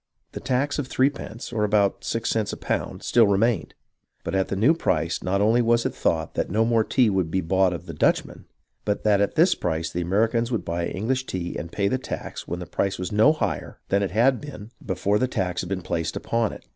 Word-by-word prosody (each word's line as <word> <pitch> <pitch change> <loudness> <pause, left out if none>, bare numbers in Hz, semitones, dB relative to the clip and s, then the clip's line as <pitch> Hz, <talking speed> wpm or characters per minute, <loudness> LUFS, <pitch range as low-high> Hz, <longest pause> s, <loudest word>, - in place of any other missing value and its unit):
The - - -6
tax 140 +3 0
of 140 - -2
threepence, 130 -3 -1
or 110 -2 0
about 105 -1 +2
six 115 0 -1
cents 110 -2 0
on - - -6
a - - -24
pound, - - -3
still 115 -3 +4
remained, 100 +1 +1 0.5
but - - -4
at 95 0 +1
the - - -2
new 115 +11 +4
price 85 - -1
not 100 +2 0
only 115 +4 +4
was 115 0 +2
it - - -1
thought 80 -1 -1
that - - -1
no 110 +2 +2
more 115 -1 +3
tea 125 +2 +3
would 95 -4 0
be 95 - 0
bought 95 +2 +2
of 85 - -6
the - - -7
Dutch - - +2
men, - - -13 0.4
but 105 -1 -1
that 105 -2 +3
at 100 - 0
this 170 +4 +5
price 80 -1 -2
the 90 - -2
Americans 115 +6 +1
would 115 - -2
buy 85 0 -2
the - - -4
English 130 +7 -1
tea 90 -1 -4
and 85 - -5
pay 100 -1 0
the 130 +6 0
tax - - -6
when 85 - -3
the 90 - -6
price 95 +3 -1
was 90 -1 -4
no 110 +8 +5
higher 155 - -3
than 100 +1 +2
it 100 - 0
had 120 +5 +2
been 120 -7 -9
before 100 +2 0
the 130 - +2
tax 90 -7 -2
had 90 - -7
been 95 -3 -3
placed 85 -1 -2
upon 115 -2 0
it. - - -11
105 Hz, 245 wpm, -24 LUFS, 90-115 Hz, 0.5 s, this